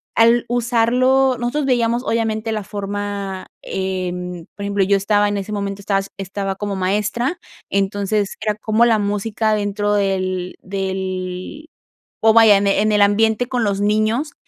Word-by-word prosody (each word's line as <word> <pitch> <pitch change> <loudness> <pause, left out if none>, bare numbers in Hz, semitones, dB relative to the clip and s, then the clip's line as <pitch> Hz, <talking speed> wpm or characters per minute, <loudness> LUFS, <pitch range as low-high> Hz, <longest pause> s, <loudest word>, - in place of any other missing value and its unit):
al 230 +1 +4
usarlo, 245 +2 +2
nosotros 245 +5 -1
veíamos, 240 -2 +1
obviamente, 225 -2 -1
la 215 -1 -2
forma, 200 -1 -4 0.2
em, 180 -2 -4
por 200 - -7
ejemplo, 200 -1 +1
yo 200 +1 +3
estaba, 205 +1 +2
en 205 - -2
ese 200 +1 -5
momento 200 -1 -3
estaba 195 -1 +1 0.2
estaba 195 0 -4
como 205 0 -4
maestra, 210 - -1 0.3
entonces 200 +1 0
era 215 -1 0
cómo 215 +2 +2
la 230 -2 +4
música 210 +2 -1
dentro 205 0 0
del 185 -2 -1
del 190 - -4 0.5
oh, 220 0 +5
vaya, 225 -2 +7
en 200 0 0
el 195 - +3
en 215 +1 +2
el 210 -1 +3
ambiente 220 +3 +3
con 250 -2 -1
los 200 -2 0
niños, 215 +8 +1
205 Hz, 155 wpm, -19 LUFS, 195-225 Hz, 0.5 s, vaya